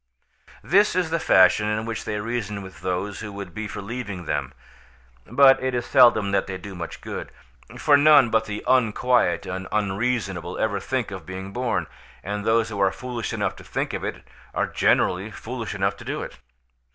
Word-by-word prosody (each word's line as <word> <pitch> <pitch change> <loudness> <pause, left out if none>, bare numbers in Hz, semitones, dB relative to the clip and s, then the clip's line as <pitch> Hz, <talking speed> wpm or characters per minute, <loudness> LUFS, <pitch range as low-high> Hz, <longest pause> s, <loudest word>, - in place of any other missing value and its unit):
This 205 +5 +3
is 180 -3 0
the 165 - +1
fashion 95 0 +5
in 105 +1 -1
which 115 -1 -4
they 105 - -2
reason 105 -2 -3
with 95 0 -12
those 95 +2 -3
who 105 -1 -6
would 100 -3 -7
be 110 +2 -4
for 100 - -7
leaving 105 -5 -5
them, - - -2 0.8
but 135 -1 +6
it 130 -1 -1
is 120 0 -1
seldom 120 -7 +5
that 100 - +1
they 95 -1 -4
do 100 +1 -9
much 85 -2 -7
good, - - -6 0.5
for 145 - +4
none 145 -4 +6
but 110 0 +2
the 105 -1 -5
unquiet 125 -6 +2
and 95 0 -5
unreasonable 100 -4 -1
ever 100 -2 0
think 125 +1 -2
of 95 -1 -8
being 95 +1 -7
born, 125 -1 -1 0.4
and 105 +1 -3
those 115 +1 +2
who 105 -2 -5
are 95 -1 +4
foolish 125 +1 -5
enough 105 -4 -2
to - - -12
think - - -3
of - - -4
it - - -5 0.3
are - - +1
generally 95 +4 +1
foolish 115 -1 -6
enough 100 0 0
to - - -11
do - - -3
it. - - -10
105 Hz, 190 wpm, -24 LUFS, 95-125 Hz, 0.8 s, but